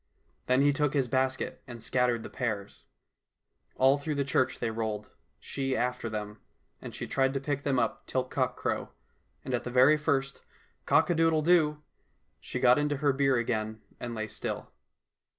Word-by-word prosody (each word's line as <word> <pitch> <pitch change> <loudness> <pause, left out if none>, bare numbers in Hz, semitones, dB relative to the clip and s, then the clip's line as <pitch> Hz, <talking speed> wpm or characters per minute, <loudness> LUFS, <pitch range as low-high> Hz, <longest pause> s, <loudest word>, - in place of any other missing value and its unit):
Then 130 +2 +4
he 145 0 +4
took 145 0 0
his 135 -3 +2
basket 130 +2 -1
and 120 -2 -8
scattered 120 0 +1
the - - -7
pears. 110 -6 -4 0.9
All 135 +2 +4
through 150 +1 -3
the 140 - +1
church 130 -1 +1
they 115 -2 -2
rolled, 110 -2 -3 0.3
she 135 -1 -2
after 125 -1 -1
them, 105 -1 -5 0.4
and - - -8
she - - -4
tried 135 0 +1
to - - +1
pick 140 0 -2
them 140 -2 0
up 115 -2 -1
till 130 - 0
cockcrow, 130 -1 -1 0.6
and 130 - -3
at 120 - 0
the - - -4
very 130 +5 +6
first 135 -2 -1 0.2
" - - -38
Cock - - +4
a - - +4
doodle 165 -1 +3
doo! 150 -3 +3 0.3
" - - -44
she 125 - -5
got 125 +1 +5
into 145 -1 0
her 145 -1 +2
bier 135 -1 +2
again 110 -2 -2 0.2
and 120 -1 -5
lay 110 0 -3
still. - - -5
130 Hz, 185 wpm, -29 LUFS, 120-140 Hz, 0.9 s, very